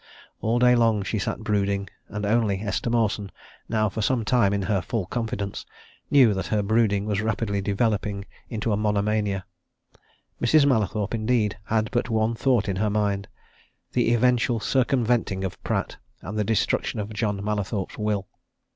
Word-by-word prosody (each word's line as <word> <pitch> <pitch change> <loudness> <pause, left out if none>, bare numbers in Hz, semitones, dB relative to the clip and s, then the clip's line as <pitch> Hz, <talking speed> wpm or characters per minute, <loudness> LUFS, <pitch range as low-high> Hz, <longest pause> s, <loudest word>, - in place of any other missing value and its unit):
All 115 +2 +1
day 125 0 +5
long 115 -4 +3
she 110 +2 -2
sat 100 - -3
brooding 100 -2 0 0.2
and 105 0 -4
only 105 -2 +2
Esther 110 +2 -2
Mawson, 110 -4 0 0.4
now 110 -1 +2
for 110 +2 -3
some 115 +1 +1
time 120 -5 +3
in 100 -1 0
her 100 -2 +1
full 100 +2 -2
confidence, 100 -2 -3 0.5
knew 130 -7 +6
that 95 - -3
her 105 -1 +1
brooding 105 -1 +2
was 105 -1 0
rapidly 110 -2 -1
developing 100 -1 -1 0.2
into 110 0 -2
a - - +2
monomania. 105 -2 0 1.0
Mrs. 140 +4 +5
Mallathorpe, 110 -5 +1
indeed, 110 -2 0
had 110 -1 0
but 120 -1 0
one 110 0 +1
thought 120 -2 +1
in 95 -2 -1
her 105 +2 +1
mind 100 -1 0 0.6
the 120 -2 +2
eventual 120 0 +2
circumventing 120 -6 +1
of 95 - -5
Pratt, - - -2 0.3
and 100 - -6
the 105 - +1
destruction 110 +1 0
of 105 +1 -4
John 105 -2 -1
Mallathorpe's 105 -1 -3
will. 105 -2 -1
105 Hz, 160 wpm, -25 LUFS, 100-115 Hz, 1.0 s, knew